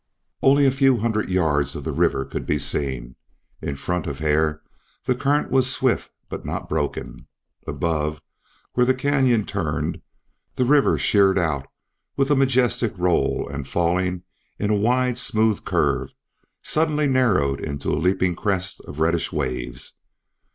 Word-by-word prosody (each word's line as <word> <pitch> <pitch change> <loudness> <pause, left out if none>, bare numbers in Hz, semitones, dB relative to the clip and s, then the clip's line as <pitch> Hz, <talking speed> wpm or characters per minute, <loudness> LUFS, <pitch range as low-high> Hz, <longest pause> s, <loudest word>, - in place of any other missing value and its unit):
Only 140 +1 +5
a 135 - +5
few 135 -1 +3
hundred 110 -2 -1
rods 80 -6 +1
of - - -6
the - - -2
river 65 - +1
could - - -6
be 75 - +1
seen. 65 -4 -3 0.5
In 70 - -3
front 90 +5 -3
of 70 - -4
Hare 75 +1 +1 0.4
the 125 - +2
current 140 +4 0
was 130 -1 +3
swift 130 -1 0 0.2
but - - -6
not - - -4
broken. 70 -5 -3 0.4
Above, 75 -2 -1 0.5
where 125 - +3
the 130 - +3
canyon 130 -5 +2
turned, - - -2 0.5
the 125 - +1
river 140 +2 +4
sheered 100 -2 +3
out 75 -6 0 0.5
with 135 +1 +2
a - - +5
majestic 125 -5 +1
roll 90 -1 +1
and 70 -1 -6
falling 90 +3 0 0.3
in 105 +1 -1
a - - +3
wide 125 +3 +1
smooth 110 -4 +1
curve - - 0 0.5
suddenly 155 -1 +1
narrowed 105 - +2
into 70 -2 -4
a 75 - 0
leaping 90 0 +2
crest 95 +1 -2
of 70 - -9
reddish 80 +1 +1
waves. 60 -1 -4
95 Hz, 150 wpm, -23 LUFS, 75-130 Hz, 0.5 s, Only